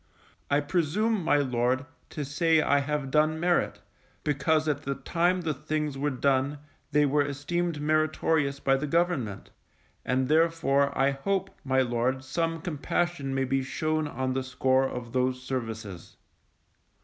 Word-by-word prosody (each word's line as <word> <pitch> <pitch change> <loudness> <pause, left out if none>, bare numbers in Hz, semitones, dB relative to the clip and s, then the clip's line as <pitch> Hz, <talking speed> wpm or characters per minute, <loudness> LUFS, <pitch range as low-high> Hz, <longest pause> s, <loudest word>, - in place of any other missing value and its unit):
I 145 +1 +3
presume, 185 +7 0
my 145 - +3
Lord, 130 -1 +1 0.2
to 150 - -4
say 160 +3 +2
I 145 -2 +3
have 140 -1 -2
done 155 +1 +2
merit, 175 +1 +1 0.4
because 155 +2 +1
at 150 - 0
the 140 0 -3
time 175 +7 0
the 160 -3 -1
things 150 +1 -3
were 145 +2 0
done, 135 +1 +1 0.3
they 150 0 +4
were 145 +1 +2
esteemed 150 +4 -2
meritorious 155 -1 +1
by 135 -1 +2
the 150 +2 -3
government; 145 - -1 0.5
and 130 0 0
therefore 155 -3 +3
I 135 +1 +3
hope, 190 +8 -2
my 130 -1 +2
Lord, 125 +2 0
some 165 +4 -2
compassion 160 -3 -2
may 135 0 +1
be 135 +1 0
shown 155 +3 -1
on 130 -2 -2
the 130 - -1
score 130 +1 +1
of 120 -1 -7
those 130 0 0
services. 110 -8 -5
145 Hz, 150 wpm, -28 LUFS, 130-155 Hz, 0.5 s, they